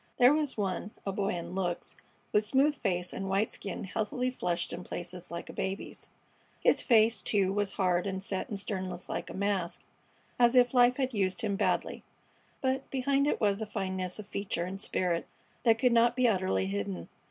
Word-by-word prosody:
There 250 Hz, +3 st, +7 dB
was 300 Hz, -4 st, -1 dB
one, 195 Hz, -1 st, -2 dB, 0.2 s
a 195 Hz, -, 0 dB
boy 195 Hz, 0 st, -1 dB
in 170 Hz, +1 st, -5 dB
looks, 180 Hz, -2 st, -2 dB, 0.4 s
with 210 Hz, -, +4 dB
smooth 275 Hz, +7 st, +3 dB
face 180 Hz, -7 st, -1 dB
and 195 Hz, 0 st, -4 dB
white 195 Hz, +3 st, +1 dB
skin 195 Hz, 0 st, -5 dB
healthily 220 Hz, +6 st, -1 dB
flushed 175 Hz, -8 st, -2 dB
in 180 Hz, -, -5 dB
places 180 Hz, 0 st, -6 dB
like 170 Hz, 0 st, -6 dB
a -, -, -8 dB
baby's. 190 Hz, +1 st, -4 dB, 0.5 s
His -, -, +4 dB
face, 225 Hz, -1 st, +4 dB
too, 195 Hz, -2 st, +2 dB
was 205 Hz, -1 st, 0 dB
hard 180 Hz, -2 st, +1 dB
and 190 Hz, 0 st, -3 dB
set 195 Hz, -3 st, -2 dB
in 205 Hz, -, -3 dB
sternness 190 Hz, -2 st, -4 dB
like -, -, -3 dB
a -, -, -7 dB
mask, 195 Hz, -3 st, -1 dB, 0.6 s
as 240 Hz, +1 st, +5 dB
if 245 Hz, 0 st, +5 dB
life 245 Hz, 0 st, +5 dB
had 260 Hz, -2 st, 0 dB
used 190 Hz, -2 st, 0 dB
him 205 Hz, -3 st, 0 dB
badly; -, -, 0 dB, 0.6 s
but 265 Hz, 0 st, -1 dB
behind 275 Hz, +1 st, +1 dB
it -, -, +1 dB
was 205 Hz, 0 st, +2 dB
a 220 Hz, -, -3 dB
fineness 185 Hz, -3 st, -3 dB
of 215 Hz, -, -7 dB
feature 190 Hz, -3 st, -3 dB
and 190 Hz, +2 st, -5 dB
spirit 175 Hz, -4 st, 0 dB, 0.4 s
that 225 Hz, -1 st, +6 dB
could 250 Hz, 0 st, +3 dB
not 235 Hz, +1 st, +4 dB
be 255 Hz, -1 st, +4 dB
utterly 185 Hz, -, +1 dB
hidden. 100 Hz, -3 st, -3 dB
200 Hz, 190 wpm, -30 LUFS, 185-235 Hz, 0.6 s, There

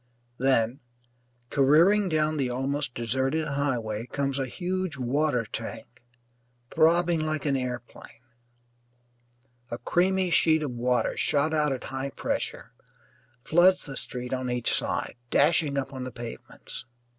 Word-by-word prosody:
Then, 130 Hz, -1 st, +2 dB, 0.7 s
careering 170 Hz, +9 st, +5 dB
down 155 Hz, -1 st, +1 dB
the 135 Hz, -3 st, 0 dB
almost 135 Hz, +1 st, -2 dB
deserted 130 Hz, +7 st, 0 dB
highway, 125 Hz, -6 st, -2 dB
comes 140 Hz, 0 st, -1 dB
a 135 Hz, -, -1 dB
huge 185 Hz, +2 st, -3 dB
water 130 Hz, -1 st, +1 dB
tank, -, -, -7 dB, 0.7 s
throbbing 170 Hz, +1 st, +4 dB
like 155 Hz, -2 st, -2 dB
an 140 Hz, -2 st, +2 dB
airplane. 125 Hz, -2 st, -6 dB, 1.5 s
A 120 Hz, -, -4 dB
creamy 185 Hz, +3 st, +1 dB
sheet 160 Hz, -2 st, +4 dB
of 145 Hz, -, -2 dB
water, 125 Hz, +1 st, 0 dB
shot 145 Hz, +2 st, +1 dB
out 150 Hz, -2 st, +2 dB
at 130 Hz, -2 st, -3 dB
high 135 Hz, +1 st, -4 dB
pressure, -, -, -3 dB, 0.7 s
floods 180 Hz, +3 st, +4 dB
the 135 Hz, -, -7 dB
street 125 Hz, -1 st, -5 dB
on 130 Hz, -1 st, -2 dB
each 125 Hz, -1 st, 0 dB
side, -, -, -2 dB
dashing 145 Hz, 0 st, +3 dB
up 135 Hz, 0 st, -2 dB
on 130 Hz, -1 st, -5 dB
the 130 Hz, -, -5 dB
pavements. 120 Hz, 0 st, -9 dB
140 Hz, 130 wpm, -27 LUFS, 125-155 Hz, 1.5 s, careering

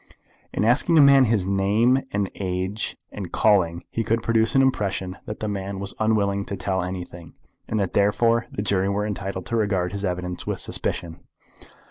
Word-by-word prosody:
In 105 Hz, -, 0 dB
asking 125 Hz, +8 st, +3 dB
a -, -, +8 dB
man 140 Hz, -2 st, +7 dB
his 110 Hz, -5 st, +1 dB
name, 100 Hz, +7 st, +2 dB
and 100 Hz, -1 st, -1 dB
age, 95 Hz, +2 st, -3 dB
and 100 Hz, -4 st, -7 dB
calling, 90 Hz, -6 st, +2 dB
he 115 Hz, -, -1 dB
could 115 Hz, +1 st, 0 dB
produce 115 Hz, +1 st, +2 dB
an 135 Hz, -, +6 dB
impression 95 Hz, -7 st, -1 dB
that 105 Hz, -, -6 dB
the 110 Hz, -, -1 dB
man 100 Hz, -1 st, -4 dB
was 100 Hz, 0 st, -5 dB
unwilling 100 Hz, -2 st, +1 dB
to 100 Hz, -, -5 dB
tell 95 Hz, 0 st, -1 dB
anything, 90 Hz, -2 st, -7 dB, 0.3 s
and 110 Hz, -, -1 dB
that, 95 Hz, -3 st, -1 dB
therefore, 115 Hz, +4 st, +2 dB
the 100 Hz, -, -3 dB
jury 100 Hz, -2 st, +1 dB
were 100 Hz, +1 st, -1 dB
entitled 100 Hz, -3 st, -4 dB
to 115 Hz, -, -3 dB
regard 100 Hz, -5 st, 0 dB
his 100 Hz, 0 st, -4 dB
evidence 90 Hz, -2 st, -3 dB
with -, -, -2 dB
suspicion. 85 Hz, -2 st, -2 dB
100 Hz, 180 wpm, -24 LUFS, 95-110 Hz, 0.3 s, a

